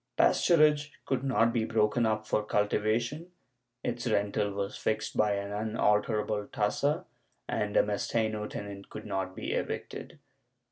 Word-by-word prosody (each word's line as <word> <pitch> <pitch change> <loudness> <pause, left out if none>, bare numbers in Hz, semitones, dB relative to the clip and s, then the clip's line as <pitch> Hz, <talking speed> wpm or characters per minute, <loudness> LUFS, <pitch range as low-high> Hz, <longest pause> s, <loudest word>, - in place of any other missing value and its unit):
Pasturage 150 -3 +4 0.2
could 130 -1 -1
not 120 -3 +3
be 115 - +1
broken 110 +1 +2
up 110 0 0
for 105 - +1
cultivation, 110 +9 0 0.5
its 120 0 -2
rental 105 -1 +1
was 100 0 -3
fixed 110 0 -2
by 105 -1 +3
an 100 0 -4
unalterable 105 0 +1
tassa, 145 - 0 0.4
and 105 -1 -1
a - - +6
mesteno 105 +1 -1
tenant 100 -1 -7
could 110 - -8
not 95 -2 -3
be - - -4
evicted. - - -4
110 Hz, 135 wpm, -30 LUFS, 105-120 Hz, 0.5 s, a